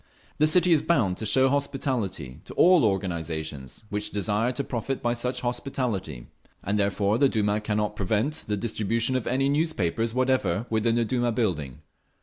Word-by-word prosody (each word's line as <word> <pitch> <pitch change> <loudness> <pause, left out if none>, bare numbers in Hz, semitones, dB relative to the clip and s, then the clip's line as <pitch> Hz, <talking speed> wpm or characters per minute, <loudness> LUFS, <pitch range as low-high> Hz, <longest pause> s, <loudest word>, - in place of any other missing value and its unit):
The 155 - +5
City 175 +3 +4
is 160 -3 +5
bound 100 - +1
to 110 - -2
show 130 +5 +4
hospitality, 125 - -2
to - - -10
all 180 -3 +6
organisations 80 - -3
which 105 0 -1
desire 105 +4 0
to 140 - -2
profit 130 +1 -3
by 120 0 0
such 125 +2 -3
hospitality, 120 - -3 0.4
and 105 +2 0
therefore 100 +2 +1
the 140 - +5
Duma 105 -2 0
cannot 105 0 -1
prevent 110 - -1
the 105 0 -1
distribution 115 +3 -1
of 125 -3 -2
any 135 +2 +1
newspapers 115 - 0
whatever 130 -3 +1
within 115 +1 +1
the 120 -1 +1
Duma 120 +1 0
building. 85 - -2
110 Hz, 160 wpm, -26 LUFS, 100-130 Hz, 0.4 s, all